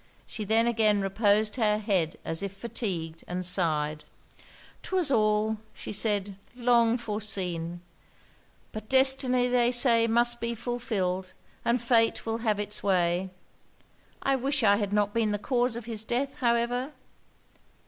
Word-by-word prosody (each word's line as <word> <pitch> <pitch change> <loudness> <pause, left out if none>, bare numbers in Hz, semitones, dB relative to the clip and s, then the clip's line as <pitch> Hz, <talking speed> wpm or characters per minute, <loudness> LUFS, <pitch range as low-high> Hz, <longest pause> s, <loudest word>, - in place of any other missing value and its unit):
She 215 - -6
then 225 +3 +3
again 220 -3 +2
reposed 210 +2 +1
her 210 -3 +2
head 195 -7 -1
as 165 0 -1
if 200 -1 -4
fatigued, 180 -8 -5
and 180 +1 -4
sighed. 155 -4 0 0.8
'Twas 365 -6 0
all,' 215 -2 +2 0.2
said 205 -2 -2 0.2
she, - - -17
'long 235 -1 +3
foreseen. 185 -7 -3 0.9
But 215 0 -8
destiny, 260 -1 +3
they 245 -1 +3
say, 240 -2 +4
must 240 +1 +2
be 235 0 -2
fulfilled, 210 -6 -3 0.3
and 235 +2 +1
fate 230 -1 +2
will 225 0 -2
have 215 -3 0
it's 210 0 -3
way. 180 -1 +1 0.9
I 275 - +2
wish 275 +1 0
I 205 -1 +5
had 205 -2 -2
not 205 0 +1
been 220 -2 +1
the - - 0
cause 245 +2 0
of 235 -1 -6
his 225 -2 -1
death, 260 +5 -2
however.' 245 +3 0
220 Hz, 140 wpm, -27 LUFS, 200-240 Hz, 0.9 s, I